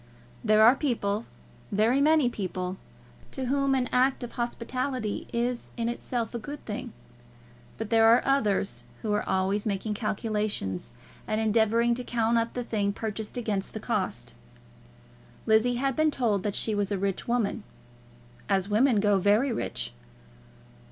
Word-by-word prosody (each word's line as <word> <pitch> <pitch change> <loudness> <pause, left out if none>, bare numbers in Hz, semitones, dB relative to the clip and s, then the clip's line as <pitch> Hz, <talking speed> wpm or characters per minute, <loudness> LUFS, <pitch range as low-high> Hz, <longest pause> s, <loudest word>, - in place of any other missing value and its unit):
There 215 0 +5
are 235 +3 +8
people, 230 -7 -1 0.5
very 225 +7 +3
many 305 -2 +4
people, 185 -4 -3 0.5
to 265 - -4
whom 275 +1 +2
an 255 -1 +1
act 255 +1 +2
of 240 - -6
hospitality 240 -1 -3
is 240 +1 -2
in 230 -1 -1
itself 240 -1 -3
a 235 - -3
good 290 +6 -8
thing; 225 +3 -5 0.9
but 225 0 -5
there 225 0 +6
are 230 +2 +6
others 215 -8 +1 0.2
who 215 -2 0
are 210 - +1
always 195 +3 0
making 210 +1 -1
calculations, 210 - -2 0.3
and 215 0 0
endeavouring 225 +2 +3
to 250 +1 -3
count 230 -1 +1
up 230 0 -3
the 245 - -2
thing 205 -3 -1
purchased 220 +1 -5
against 210 -5 -2
the - - -3
cost. - - -2 1.1
Lizzie 220 +3 +3
had 270 +1 0
been 310 0 +3
told 230 -9 0
that 205 0 -2
she 220 - 0
was 205 -1 -1
a 200 - +1
rich 195 0 -2
woman, 235 -3 0 0.9
as 195 0 +1
women 225 +2 +4
go, 205 -2 +3
very 210 +8 +3
rich. - - -3
225 Hz, 150 wpm, -27 LUFS, 205-245 Hz, 1.1 s, are